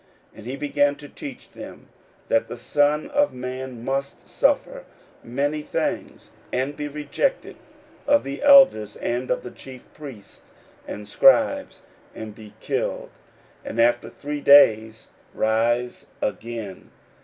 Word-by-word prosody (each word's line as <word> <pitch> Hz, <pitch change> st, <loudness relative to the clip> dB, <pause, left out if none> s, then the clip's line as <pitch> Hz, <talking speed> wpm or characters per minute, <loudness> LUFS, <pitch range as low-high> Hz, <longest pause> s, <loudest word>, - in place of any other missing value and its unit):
41:008:031 -, -, -22 dB
And 110 Hz, -, -10 dB
he 130 Hz, +2 st, -4 dB
began 145 Hz, 0 st, +1 dB
to 145 Hz, 0 st, -12 dB
teach 135 Hz, -3 st, -10 dB
them, -, -, -11 dB, 0.4 s
that -, -, +1 dB
the -, -, -7 dB
Son 145 Hz, -, +1 dB
of 290 Hz, 0 st, +2 dB
man 125 Hz, -1 st, -6 dB
must 135 Hz, +1 st, -3 dB
suffer -, -, 0 dB, 0.4 s
many 145 Hz, +5 st, -2 dB
things, -, -, -4 dB, 0.2 s
and 135 Hz, +3 st, -1 dB
be 150 Hz, -, -4 dB
rejected 150 Hz, -, -2 dB, 0.5 s
of 285 Hz, 0 st, +4 dB
the 140 Hz, 0 st, -6 dB
elders, 270 Hz, -, +6 dB
and 125 Hz, +2 st, -3 dB
of 125 Hz, -, -1 dB
the 125 Hz, -, -8 dB
chief 130 Hz, -2 st, -12 dB
priests, 135 Hz, -9 st, -12 dB, 0.5 s
and 105 Hz, 0 st, -7 dB
scribes, 270 Hz, -, +3 dB, 0.3 s
and 110 Hz, -1 st, -7 dB
be 105 Hz, -1 st, -14 dB
killed, -, -, -3 dB, 0.5 s
and 115 Hz, -, -6 dB
after 120 Hz, +1 st, +3 dB
three 145 Hz, 0 st, -6 dB
days 110 Hz, -6 st, +5 dB, 0.3 s
rise 120 Hz, +3 st, 0 dB
again. 110 Hz, -3 st, -5 dB
130 Hz, 130 wpm, -23 LUFS, 115-150 Hz, 0.5 s, elders